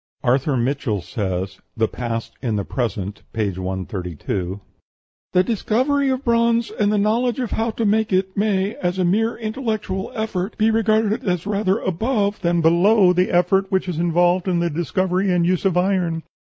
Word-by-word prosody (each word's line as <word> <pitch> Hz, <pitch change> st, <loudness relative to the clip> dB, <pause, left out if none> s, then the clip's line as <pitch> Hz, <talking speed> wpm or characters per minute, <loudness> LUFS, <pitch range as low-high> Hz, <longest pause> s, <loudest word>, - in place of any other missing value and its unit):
Arthur 130 Hz, +2 st, +2 dB
Mitchell 120 Hz, -6 st, -1 dB
says 95 Hz, -3 st, -3 dB, 0.2 s
("The 110 Hz, 0 st, +2 dB
Past 115 Hz, -1 st, -4 dB
in 115 Hz, -5 st, -1 dB
the 100 Hz, -2 st, -2 dB
Present," 105 Hz, -6 st, -3 dB
p. 110 Hz, -3 st, 0 dB
132), 95 Hz, 0 st, -4 dB, 0.7 s
"The 180 Hz, -, +5 dB
discovery 255 Hz, +7 st, +1 dB
of 260 Hz, +1 st, -2 dB
bronze, 235 Hz, 0 st, +2 dB
and 210 Hz, -1 st, +1 dB
the 210 Hz, -, +2 dB
knowledge 230 Hz, +4 st, +1 dB
of 250 Hz, -4 st, -3 dB
how 225 Hz, +1 st, 0 dB
to 225 Hz, 0 st, -2 dB
make 215 Hz, +1 st, +2 dB
it, 190 Hz, 0 st, 0 dB
may, 200 Hz, 0 st, +1 dB
as 180 Hz, +1 st, -2 dB
a 185 Hz, -, +1 dB
mere 220 Hz, +6 st, +1 dB
intellectual 220 Hz, -4 st, -3 dB
effort, 220 Hz, -3 st, -3 dB
be 220 Hz, +1 st, +3 dB
regarded 220 Hz, -1 st, +1 dB
as 180 Hz, -1 st, 0 dB
rather 200 Hz, -1 st, +1 dB
above 205 Hz, +2 st, -1 dB
than 170 Hz, 0 st, +1 dB
below 180 Hz, +4 st, +5 dB
the 180 Hz, +1 st, +2 dB
effort 190 Hz, +2 st, +2 dB
which 190 Hz, 0 st, +1 dB
is 170 Hz, -3 st, -3 dB
involved 175 Hz, +2 st, +2 dB
in 180 Hz, -2 st, +1 dB
the 170 Hz, 0 st, 0 dB
discovery 185 Hz, +4 st, 0 dB
and 175 Hz, -1 st, +2 dB
use 180 Hz, +2 st, 0 dB
of 185 Hz, -2 st, +2 dB
iron. 180 Hz, -3 st, +1 dB
185 Hz, 170 wpm, -21 LUFS, 150-215 Hz, 0.7 s, The